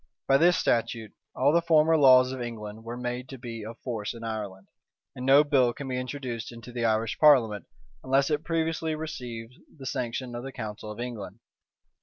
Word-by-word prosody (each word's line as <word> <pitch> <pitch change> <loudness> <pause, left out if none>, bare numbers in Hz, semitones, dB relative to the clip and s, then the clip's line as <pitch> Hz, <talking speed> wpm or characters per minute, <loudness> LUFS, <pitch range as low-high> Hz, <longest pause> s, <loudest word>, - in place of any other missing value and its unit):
By 135 - +5
this 175 +1 +5
statute, 115 -1 0 0.2
all 140 +3 +3
the 170 - +4
former 160 -1 +4
laws 130 -3 +6
of 130 -1 -5
England 110 -2 -7
were 115 +1 -6
made 125 +1 -4
to 135 - -8
be 115 -3 -7
of 115 +2 -8
force 115 -3 -4
in 115 - -9
Ireland; 105 -4 -5 0.5
and 125 +1 -5
no 140 +2 +7
bill 135 -5 +3
can 140 - -7
be 125 -1 -2
introduced 125 -3 -5
into 115 0 -11
the 120 -1 -2
Irish 110 +1 0
parliament, 120 -9 +5 0.4
unless 135 +3 +2
it 150 +1 0
previously 160 -1 -1
receive 125 -7 -6 0.3
the 135 - -10
sanction 125 0 -3
of 120 - -5
the 135 - -6
council 110 -3 -6
of 105 - -9
England. 120 -4 -6
125 Hz, 190 wpm, -27 LUFS, 115-140 Hz, 0.5 s, no